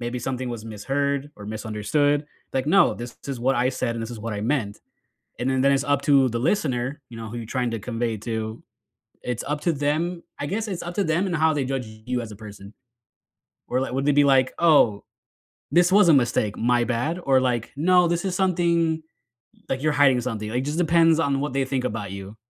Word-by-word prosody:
maybe 120 +1 -3
something 130 0 -3
was 115 -2 -6
misheard 140 +6 -2
or 105 -1 -10
misunderstood, 110 +7 0 0.3
like, 130 0 -1
"No, 185 +3 +4
this 120 0 -8
is 135 -3 -3
what 130 +2 +2
I 125 +1 +2
said, 120 -2 -2
and 115 - -3
this 115 - -6
is 115 - -7
what 115 0 -4
I 105 - -4
meant," 110 -3 -1 0.6
and 125 - -1
then 130 -1 +1
then 140 - +4
it's 135 - +1
up 145 -1 +1
to 140 -3 +5
the 115 - -2
listener, 140 - -1
you 115 - -9
know, 115 -1 -7
who 120 - -6
you're 115 - -6
trying 125 0 -1
to 115 - -2
convey 115 0 -2
to. 110 0 -4 0.6
It's 125 -2 -3
up 150 +1 -2
to 170 - +2
them 160 +5 -1 0.2
I 145 - -3
guess 215 +6 -2
it's 185 -3 -4
up 175 0 -6
to 200 - +1
them 170 +4 +1
and 180 - -2
how 160 +1 +3
they 145 -2 0
judge 130 -2 -3
you 110 +3 -4
as 110 -2 -8
a - - -10
person. 105 -1 -11 0.9
Or, 125 +1 0
li 135 - -3
would 135 +2 -1
they 145 - +4
be 145 0 +5
like, 135 -2 +3
"Oh, 145 -11 +4 0.7
this 175 +1 +4
was 200 -2 +6
a - - +7
mistake, 120 -5 +1
my 120 +1 +2
bad," 135 +9 -1
or, 135 -1 +4
like, 120 -3 -1
"No, 180 +4 +4
this 170 +1 -1
is 190 - -1
something 170 -3 +1 0.7
like, 130 0 -2
you're 155 -1 +2
hiding 135 -4 +4
something," 110 -3 -4
like, 125 +3 -1
just 150 +2 -3
depends 165 -1 +4
on 140 -3 +1
what 145 -2 -3
they 135 0 +1
think 130 -1 -2
about 105 -4 -4
you, 100 +2 -8
130 Hz, 225 wpm, -24 LUFS, 115-155 Hz, 0.9 s, a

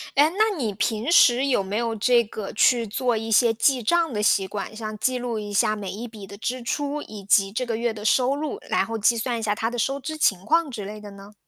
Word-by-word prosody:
诶， 295 +3 +5
那 435 -2 +2
你 220 -7 -2
平 225 - -1
时 255 -5 +5
有 245 -8 +1
没 200 +3 -3
有 230 -1 -1
这 240 +2 +3
个 215 -1 -7
去 235 +1 +3
做 245 +1 0
一 225 +1 -5
些 230 +1 +4
记 250 +3 +2
账 330 +3 +1
的 210 - -1
习 195 -2 +2
惯？ 205 +2 -6
像 215 -1 -6
记 255 +4 0
录 240 -3 -3
一 205 -1 -6
下 215 +1 +2
每 200 -3 -6
一 230 +4 -6
笔 210 -3 -11
的 200 +1 -11
支 250 +3 -3
出， 290 +4 -3
以 205 -2 -10
及 195 0 +3
这 250 +4 -2
个 230 - -2
月 235 -1 -1
的 210 0 -9
收 260 +4 +3
入， 310 +8 -4
然 - - +1
后 225 0 -4
计 230 +2 +2
算 235 +1 -2
一 - - -6
下 210 -1 0
它 225 +1 -1
的 245 - -6
收 275 +4 -1
支 310 +3 -6
情 195 -10 +1
况 330 -1 +2
之 210 -6 -6
类 210 +1 -8
的 205 -1 -10
呢？ 200 +1 -13
225 Hz, 280 characters per minute, -24 LUFS, 210-255 Hz, -, 诶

